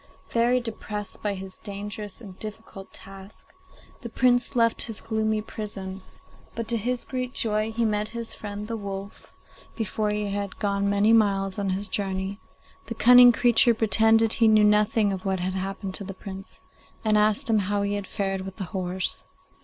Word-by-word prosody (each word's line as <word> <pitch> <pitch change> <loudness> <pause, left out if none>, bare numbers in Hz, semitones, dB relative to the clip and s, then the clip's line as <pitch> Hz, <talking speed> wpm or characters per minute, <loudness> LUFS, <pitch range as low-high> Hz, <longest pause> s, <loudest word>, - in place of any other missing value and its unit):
Very 240 +2 +3
depressed 210 -3 -6
by 205 -1 -1
his 190 0 -8
dangerous 205 0 -7
and 195 -5 -10
difficult 215 -2 -9
task, 195 +1 -11 0.5
the 235 - -6
Prince 245 +2 +2
left 230 -1 +3
his 225 -3 -3
gloomy 220 -1 -1
prison; 195 -3 -7 0.5
but, 230 -1 -4
to 235 - +1
his 245 +3 -2
great 255 -1 -4
joy, 215 0 0
he 230 +1 0
met 210 -1 0
his 230 0 -4
friend 205 0 -6
the 230 - -3
wolf 200 -1 -7 0.4
before 215 -1 -1
he 210 -1 -2
had 200 -1 -4
gone 200 -1 0
many 205 +2 +3
miles 195 -3 +2
on 200 -1 -1
his 195 +2 0
journey. 195 0 -3 0.5
The 230 - -5
cunning 245 +2 +8
creature 235 0 +4
pretended 225 +1 +4
he 230 - +4
knew 215 -1 +5
nothing 210 0 +3
of 190 - -5
what 190 -1 -1
had 185 +1 -2
happened 190 0 -4
to 200 - -2
the 195 -1 -7
Prince, 195 0 -9 0.4
and 215 -1 +3
asked 215 +6 +2
him 220 -2 +3
how 200 +1 0
he 200 0 -1
had 205 -2 -3
fared 195 -2 -2
with 190 0 -7
the 200 - -5
horse. 185 -1 -2
210 Hz, 175 wpm, -25 LUFS, 195-225 Hz, 0.5 s, cunning